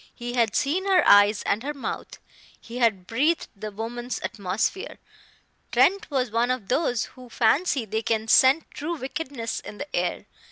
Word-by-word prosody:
He 240 0 -6
had 230 -4 +1
seen 350 +8 0
her 380 -2 +4
eyes 205 +1 +6
and 210 - 0
her 295 +3 -4
mouth; 275 - -6 0.4
he 240 +2 -8
had 215 -7 +2
breathed 295 - 0
the 215 +2 -6
woman's 240 +4 -5
atmosphere. 205 - -3 0.7
Trent 395 +3 +3
was 260 -5 -1
one 230 +2 +1
of 255 -6 -2
those 245 -5 +1
who 255 -1 -13
fancy 255 +3 +2
they 220 +1 -2
can 220 -1 -1
scent 265 +7 +4
true 325 +4 -4
wickedness 265 -4 -4
in 210 - -10
the 290 - -6
air. - - -1
245 Hz, 165 wpm, -25 LUFS, 220-285 Hz, 0.7 s, eyes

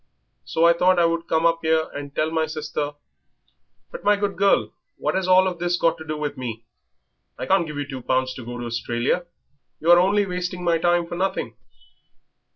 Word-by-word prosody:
So 165 - +1
I 170 - +7
thought 180 +2 +3
that 175 - +3
I - - +5
would 165 0 -1
come 160 +1 +1
up 165 0 +3
'ere 160 0 +2
and 145 -1 -7
tell 155 +1 0
my 160 -1 0
sister 150 -1 -4 0.5
" - - -45
"But, - - -8
my 205 0 +4
good 200 0 -2
girl, 200 +1 +2 0.2
what - - -1
has 190 -1 -1
all 185 0 +5
this 175 0 -1
got 165 -1 +1
to - - -7
do 155 -1 -4
with 150 -1 -4
me? 115 -3 -6 0.7
I - - -4
can't 190 -3 +2
give 150 -1 -7
you 145 -1 -3
two 135 -3 -6
pounds 130 +1 0
to 130 - -9
go 120 +1 -7
to 120 - -5
Australia. 120 +8 -1 0.5
You 165 +3 +3
are 175 - +8
only 200 +3 +3
wasting 180 -1 -4
my 170 -1 +2
time 175 0 +2
for 170 - -8
nothing." 190 +2 -2
165 Hz, 215 wpm, -23 LUFS, 145-180 Hz, 0.7 s, are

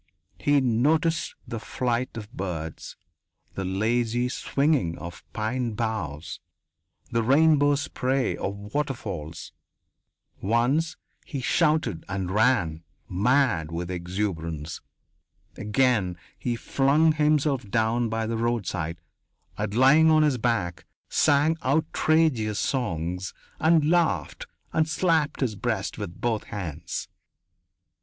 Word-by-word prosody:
He 145 0 +3
noticed 155 +7 +1
the 115 - -4
flight 120 +1 -2
of 105 0 -8
birds, 80 -4 -5 0.6
the 95 - -4
lazy 115 +5 0
swinging 135 - 0
of 85 0 -9
pine 115 +2 -2
boughs, 105 -9 -3 0.7
the 115 - +2
rainbow 145 +3 +4
spray 135 -2 -1
of 100 +1 -5
waterfalls. 100 - -4 0.9
Once 125 - +1 0.3
he 140 - -5
shouted 150 - +1
and 95 -1 -2
ran, 105 -8 +2 0.3
mad 100 - +2
with 85 +2 -4
exuberance. 85 -4 -3 0.7
Again 105 -4 +1 0.2
he 120 -1 -2
flung 140 +6 +3
himself 150 -6 +1
down 115 +2 +1
by 115 0 -1
the 115 +1 -2
roadside 95 -8 -1 0.6
and, - - -2
lying 145 +6 +6
on 155 -1 +5
his 140 -5 +2
back, 110 -8 -1 0.2
sang 155 +2 +3
outrageous 140 -5 +2
songs 90 - -2 0.2
and 160 -1 +4
laughed 160 - +1 0.3
and 155 0 +2
slapped 160 -3 +1
his 125 -5 +1
breast 100 - -2
with 85 - -6
both 115 -3 -1
hands. 90 -9 -5
120 Hz, 105 wpm, -26 LUFS, 95-145 Hz, 0.9 s, lying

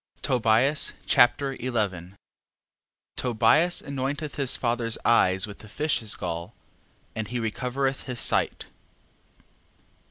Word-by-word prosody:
Tobias 125 +3 +2
Chapter 135 +3 +4
11 100 -7 -2 1.0
Tobias 125 +9 +3
anointeth 140 +2 -3
his 135 -2 +1
father's 115 -2 0
eyes 95 -5 +4
with 100 -2 -10
the 110 - -13
fish's 130 -5 -1
gall, 85 -2 -5 0.6
and 110 -1 -3
he 125 +2 -3
recovereth 125 +4 -2
his 125 -2 -5
sight. - - 0
120 Hz, 100 wpm, -26 LUFS, 110-135 Hz, 1.0 s, Chapter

